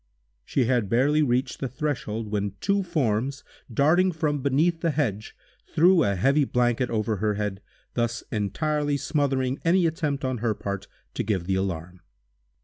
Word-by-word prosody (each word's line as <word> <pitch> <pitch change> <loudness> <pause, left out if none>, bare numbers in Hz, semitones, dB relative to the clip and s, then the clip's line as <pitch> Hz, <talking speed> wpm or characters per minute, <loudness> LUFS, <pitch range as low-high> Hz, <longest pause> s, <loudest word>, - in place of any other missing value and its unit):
She 130 - 0
had 120 -5 +1
barely 140 +6 +3
reached 130 -1 0
the 135 - -2
threshold, 120 -6 -3
when 100 -2 -1
two 200 - +1
forms, 140 - -1 0.3
darting 165 +10 +3
from 150 -3 -1
beneath 155 +5 +2
the 170 - +1
hedge, 120 -9 -2 0.3
threw 175 +2 +4
a 100 -1 +1
heavy 140 +10 +3
blanket 125 -1 +1
over 110 -1 -1
her 105 +1 0
head, 105 -1 -3 0.3
thus 120 0 -1
entirely 145 +8 0
smothering 135 -3 0
any 175 +2 +3
attempt, 150 -4 -1
on 130 -2 -1
her 110 -1 0
part, 100 0 -5 0.3
to - - -2
give 95 -5 -1
the 95 - 0
alarm. 90 -2 -3
130 Hz, 155 wpm, -25 LUFS, 105-150 Hz, 0.3 s, threw